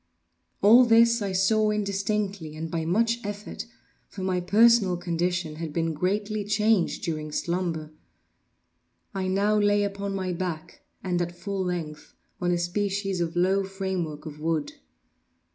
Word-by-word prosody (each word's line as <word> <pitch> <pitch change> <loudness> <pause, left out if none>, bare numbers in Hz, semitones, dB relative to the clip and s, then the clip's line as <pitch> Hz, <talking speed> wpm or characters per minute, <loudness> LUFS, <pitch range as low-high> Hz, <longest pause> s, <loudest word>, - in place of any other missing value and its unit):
All 230 +5 +8
this 230 0 +5
I 200 -1 -2
saw 215 +3 +3
indistinctly 200 -4 -2
and 160 +1 -5
by 165 -1 -2
much 230 +7 +1
effort—for 205 -1 -9
my 185 -1 0
personal 210 -1 +4
condition 175 -2 -2
had 160 -1 -5
been 165 +1 -1
greatly 205 +6 -1
changed 210 -1 +1
during 155 -3 -3
slumber. 170 -2 -2 1.2
I 190 -1 -2
now 205 +3 +2
lay 205 0 +3
upon 200 0 -3
my 185 -2 -2
back, 170 -2 -5 0.2
and 180 -2 0
at 175 0 -4
full 200 -1 -3
length, 165 -4 -5 0.3
on 175 - +1
a 175 - +2
species 195 +1 -1
of 170 0 -2
low 190 +3 +2
framework 190 -6 -4
of 150 -1 -8
wood. 160 -1 -1
185 Hz, 140 wpm, -26 LUFS, 170-205 Hz, 1.2 s, All